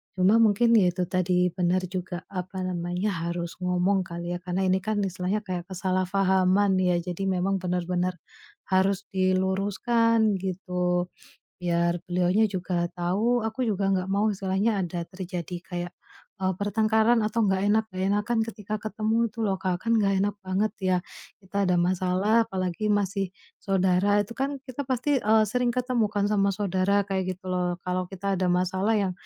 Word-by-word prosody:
cuma 190 +5 +4
mungkin 225 +2 +4
ya 190 -5 +5
itu 180 +1 -2
tadi, 180 -1 +2
benar 180 +1 0
juga, 180 -1 -4
apa 185 0 -4
namanya, 180 +2 -2 0.2
harus 170 0 -4
ngomong 180 +2 +1
kali 170 0 -6
ya - - -5
karena 180 +1 -1
ini 185 +1 +3
kan 215 +2 -2
istilahnya 190 +2 -2
kayak 180 -3 -5
kesalahpahaman 190 +1 +2
ya, 180 -1 +2
jadi 180 +2 -4
memang 190 +1 0
benar-benar 180 0 -1 0.5
harus 190 0 +2
diluruskan 200 +4 +2
gitu. 180 -1 -1 0.5
Biar 170 0 +1
beliaunya 180 +4 +2
juga 180 -2 -1
tahu, 205 +8 +1
aku 235 +4 -2
juga 200 -2 0
nggak 185 -1 0
mau 205 +2 +2
istilahnya 195 +2 0
ada 175 0 -4
terjadi 180 -2 -5
kayak, 175 -1 -5 0.5
eee, 190 0 +1
pertengkaran 220 +3 +2
atau 225 +2 0
gak 190 0 +1
enak 220 +2 +3
gak 185 - -8
enakan 210 +3 0
ketika 210 -1 -6
ketemu 220 +2 0
itu 230 - -9
loh, 195 -2 +1
Kak, 185 -1 -2
kan 230 - +2
gak 195 -2 +2
enak 205 0 -1
banget 190 +3 0
ya 185 -1 +2 0.4
kita 200 +1 -1
ada 180 - +3
masalah, 185 +5 +2
apalagi 185 +1 -2
masih 195 -2 0 0.3
saudara, 195 +1 +2
itu 210 - -9
kan 275 +2 -1
kita 255 +2 -5
pasti, 265 +2 +1
eee, 220 0 +4
sering 250 +1 +1
ketemu 250 -3 +1
kan 205 -1 0
sama 200 -1 +2
saudara 200 0 +1
kayak 190 -1 -1
gitu 185 0 -7
loh. 180 -1 0
Kalau 180 0 -1
kita 195 0 -2
ada 185 - +1
masalah 185 +4 +1
yang 190 -2 0
190 Hz, 160 wpm, -26 LUFS, 180-210 Hz, 0.5 s, ya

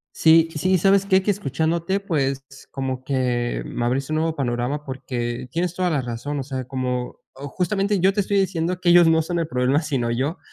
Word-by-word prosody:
Sí, 165 0 +5
sí. 185 +5 +2
¿Sabes 195 +2 +3
qué? 190 -1 +3
Que 205 - +1
escuchándote. 170 +1 -1
Pues 140 -8 -1 0.3
como 130 -1 -4
que 125 -3 -1
me 120 - -3
abriste 135 +4 -1
un 155 - +1
nuevo 160 0 0
panorama 130 +2 -2
porque 125 -2 -4
tienes 175 +3 -2
toda 180 -1 0
la 150 -5 0
razón. 125 +4 -4
O - - -3
sea, 130 -1 -5
como, 125 -1 -3 0.2
oh, 140 +2 -8
justamente 195 +5 0
yo 190 +2 +4
te 205 - +1
estoy 200 +1 0
diciendo 180 -2 -1
que 175 - +2
ellos 175 -1 +7
no 160 0 +4
son 170 +2 -2
el 165 - -1
problema, 130 +1 +1
sino 135 -7 -1
yo. 140 +9 -1
150 Hz, 205 wpm, -22 LUFS, 130-175 Hz, 0.3 s, ellos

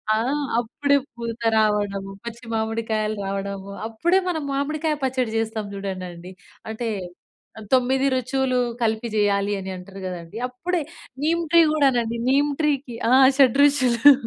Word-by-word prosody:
ఆహ్, 270 +7 0 0.2
అప్పుడే 280 +5 +1 0.2
పూత 235 -1 -6 0.2
రావడం, 205 -2 +1 0.2
పచ్చి 235 +1 -8
మామిడికాయలు 220 -1 -1
రావడము. 195 0 -4 0.2
అప్పుడే 340 +12 +2
మనం 315 -4 -2
మామిడికాయ 305 +2 -1
పచ్చడి 255 -3 -1
చేస్తాం 220 -1 -2
చూడండండి. 185 -2 -6 0.4
అంటే 225 +1 -3 0.8
9 260 +1 +3
రుచులు 255 0 0 0.2
కలిపి 220 +1 0
జేయాలి 205 -1 +1
అని 190 0 -6
అంటారు 190 +2 -10
కదండీ! 180 +2 -6
అప్పుడే 330 +8 -2 0.4
నీమ్ 335 +2 +2
ట్రీ 335 0 +7
కూడానండి. 245 -6 +2
నీమ్ 285 +2 +3
ట్రీకి 280 -5 -1
ఆహ్, 260 +1 +7
షడ్రుచులు 275 0 +6
235 Hz, 120 wpm, -23 LUFS, 210-275 Hz, 0.8 s, ట్రీ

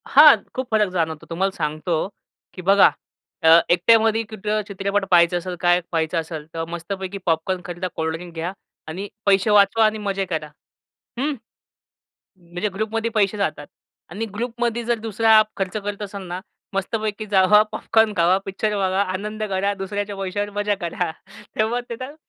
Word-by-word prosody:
हां, 295 -2 +8 0.2
खूप 260 0 -3
फरक 210 -2 +3
जाणवतो. 160 -3 -2
तुम्हाला 190 +4 0
सांगतो, 155 +1 -1 0.5
की 185 - -8
बघा 195 +1 +6 0.5
अ, 160 - +6 0.2
एकट्यामध्ये 225 +5 +4
कुठं 215 0 -2
चित्रपट 200 0 -1
पहायचं 175 0 +5
असेल, 180 +1 -5
काय 175 0 +4
पहायचं 165 0 0
असेल. 160 -2 -6
तर 165 0 -3
मस्तपैकी 190 +3 -5
पॉपकॉर्न 170 +3 0
खरीदा 175 +1 -4
कोल्ड 160 0 -1
ड्रिंक 170 +1 -9
घ्या 165 +2 -3 0.4
आणि 185 +6 -5 0.2
पैसे 200 +1 +3
वाचवा 210 +2 +5
आणि 215 0 +1
मजे 195 -2 -2
करा. 160 -4 -3 0.7
हं, 290 +4 0 1.0
म्हणजे 180 +3 -4
ग्रुपमध्ये 220 +2 -2
पैसे 210 -1 +2
जातात. 170 -7 -2 0.4
आणि 205 +6 -4
ग्रुपमध्ये 235 +1 -2
जर 235 0 0
दुसरा 220 0 +4
खर्च 195 0 -2
करत 205 0 -4
असाल 200 -1 -6
ना, 175 +1 -5 0.3
मस्तपैकी 215 +2 -2
जावा 205 +1 +5
पॉपकॉर्न 220 -1 +2
खावा, 175 +2 +4
पिक्चर 210 +2 -1
बघा 190 0 +1
आनंद 205 +3 -4
करा, 195 +1 0
दुसऱ्याच्या 205 +1 -4
पैशावर 200 +2 -3
मजा 205 0 +1
करा. 170 -2 -2 0.5
तेव्हा 225 +3 +1
तिथं 255 +5 -6
195 Hz, 155 wpm, -22 LUFS, 175-215 Hz, 1.0 s, हां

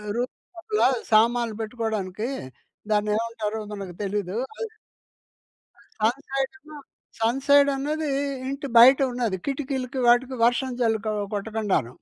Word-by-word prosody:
Room 245 +2 -2 0.2
లోపాలా 425 -4 +2 0.2
సామాన్లు 230 0 +3
బెట్టుకోడానికీ, 220 -1 -3 0.6
దాన్నేమంటారో 215 +1 -1
మనకు 195 -4 -7
తెలీదూ 200 0 -2 0.2
అది. 450 - -2 1.3
సన్‌సైడేమో 275 +6 -2 0.4
సన్‌సైడన్నదీ 280 +4 +2 0.4
ఇంటి 275 +1 -4
బయట 260 +3 +9
ఉన్నది. 235 -6 -1
కిటికీలకి, 265 -2 -3
వాటికి 250 +2 +3
వర్షం 250 +2 +2
జల్లు 225 -2 +2
కొ 215 - 0 0.2
కొట్టకుండాను. 205 - -1
240 Hz, 95 wpm, -25 LUFS, 215-270 Hz, 1.3 s, బయట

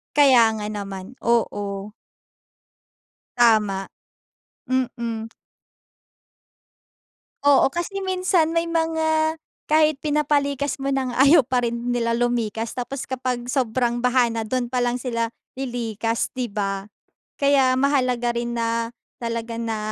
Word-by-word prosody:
Kaya 265 -5 +7
nga 210 -1 -4
naman, 200 +2 -6
oo. 205 -3 -1 1.5
Tama. 210 -5 +3 0.8
Mm. 235 -3 -2 2.1
Oo, 280 -1 +4
kasi 385 +3 -3
minsan 365 -3 +1
may 335 0 0
mga 320 -1 +1 0.3
kahit 310 -1 +3
pinapalikas 285 -2 0
mo 275 0 -2
na 265 -2 0
nga, 255 +3 +3
ayaw 295 +2 +7
pa 250 -1 0
rin 235 +1 -3
nila 230 -1 0
lumikas 230 -1 -1
tapos 250 +2 -5
kapag 250 -1 -3
sobrang 240 -2 0
baha 245 0 +3
na, 225 -1 -3
do'n 245 +1 -2
pa 250 - -2
lang 245 0 0
sila 230 -3 -1 0.3
lilikas, 230 -3 -2
'di 240 -5 -3
ba. 195 -1 -2 0.5
Kaya 275 -2 +3
mahalaga 255 -3 +1
rin 235 0 -3
na, 230 0 0 0.3
talaga 230 0 -3
na, 225 -1 -2
245 Hz, 115 wpm, -23 LUFS, 230-275 Hz, 2.1 s, Kaya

